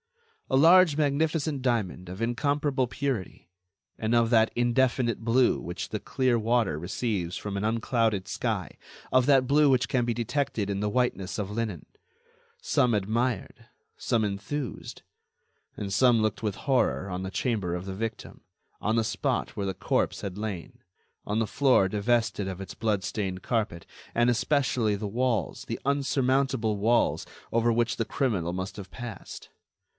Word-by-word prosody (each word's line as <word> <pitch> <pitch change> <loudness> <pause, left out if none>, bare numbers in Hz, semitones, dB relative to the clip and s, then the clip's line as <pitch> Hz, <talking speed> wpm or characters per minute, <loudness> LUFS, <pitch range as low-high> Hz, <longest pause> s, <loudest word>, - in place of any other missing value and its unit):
A 130 - +3
large 165 +1 +6
magnificent 150 0 0
diamond 105 -8 -1
of 95 +4 -7
incomparable 135 +2 0
purity, 125 -10 -4 0.5
and 110 +1 0
of 115 -1 +3
that 110 -1 +4
indefinite 120 -1 +1
blue 120 +2 +2
which 85 +1 -5
the - - -3
clear 130 -2 +1
water 110 -7 +1
receives 90 +1 -2
from 105 -1 -5
an 100 - -2
unclouded 110 -3 0
sky, - - -3 0.4
of 130 0 +4
that 135 -3 +5
blue 145 +1 +5
which 130 -2 +3
can 130 -3 +1
be 120 0 0
detected 115 -2 -1
in 100 - -2
the 105 - 0
whiteness 115 -5 -1
of 105 -2 -3
linen. 105 -6 -3 0.8
Some 125 -2 +2
admired, 110 +2 -2 0.3
some 115 -2 0
enthused... 105 +7 -5 0.7
and 100 -2 -4
some 120 +1 +4
looked 110 0 -1
with 105 -3 -1
horror 130 -7 +1
on 90 0 -3
the 95 - -4
chamber 105 -7 -1
of 90 +1 -4
the 95 -1 -5
victim, 110 +2 -5 0.4
on 110 +2 +1
the 115 - +2
spot - - -1
where 100 -1 -2
the 95 - -3
corpse - - 0
had 100 -1 -5
lain, 105 -5 -5 0.5
on 105 +2 -1
the 115 - 0
floor 130 -8 +3
divested 105 0 0
of 95 -1 -6
its 95 - -7
blood 105 -4 -1
stained 95 -2 -3
carpet, 105 -8 -1 0.3
and 120 +1 +3
especially 125 -3 +1
the 105 +1 -4
walls, 115 - -1
the - - -4
unsurmountable 135 -4 +1
walls 115 +4 +2 0.3
over 115 +1 +3
which 120 0 +1
the 115 - 0
criminal 105 -9 -1
must 95 +1 -4
have 95 -3 -9
passed. 120 -3 -8
115 Hz, 160 wpm, -27 LUFS, 100-130 Hz, 0.8 s, large